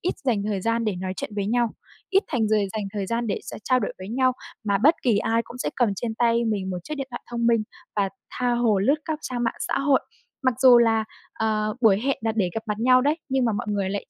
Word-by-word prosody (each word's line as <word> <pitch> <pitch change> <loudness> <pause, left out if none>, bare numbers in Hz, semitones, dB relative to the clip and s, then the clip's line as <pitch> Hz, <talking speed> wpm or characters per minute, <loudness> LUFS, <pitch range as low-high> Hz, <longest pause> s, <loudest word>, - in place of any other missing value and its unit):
ít 355 - -1
dành 230 -6 +1
thời 205 -2 -1
gian 230 +3 0
để 210 -4 -1
nói 185 +1 -3
chuyện - - -5
với 200 -1 -1
nhau, 240 +2 +2 0.4
ít 390 +1 +4
thành 230 -7 0
giời 215 -2 +2
dành 215 -2 -3
thời 200 -2 -2
gian 230 +3 -1
để 205 - -1
s - - -8
trao 255 -1 +3
đổi 210 - -2
với 185 - -8
nhau. 255 +3 +2 0.3
Mà 200 -2 +2
bất 305 +9 +5
kỳ 230 -5 +3
ai 230 +2 +1
cũng 240 - -11
sẽ - - -1
cầm 240 -3 +3
trên 225 +2 -3
tay 235 0 +2
mình 200 -4 -1
một 180 - -3
chiếc 305 - -4
điện 275 -2 -4
thoại 240 - -6
thông 235 -1 -1
minh 230 -2 +3 0.3
và 200 -1 +2 0.2
tha 250 -1 -1
hồ 235 -4 +2
lướt 240 +10 +3
các 315 -1 -2
trang 245 -1 -3
mạng 230 - 0
xã - - +1
hội. 275 -1 +3 0.4
Mặc 260 -2 +2
dù 255 -2 +8
là, 225 -2 +3 0.3
ờ, 215 -1 -1
buổi 210 -4 +5
hẹn 275 +3 0
là 225 0 0
để 190 -5 +1
gặp 225 - -3
mặt 210 -1 -2
nhau 255 +2 +5
đấy, 295 +5 +1
nhưng 265 -2 +1
mà 230 - +2
mọi 225 +4 -3
người 200 -2 -1
lại 200 - -3
230 Hz, 270 wpm, -24 LUFS, 210-250 Hz, 0.4 s, dù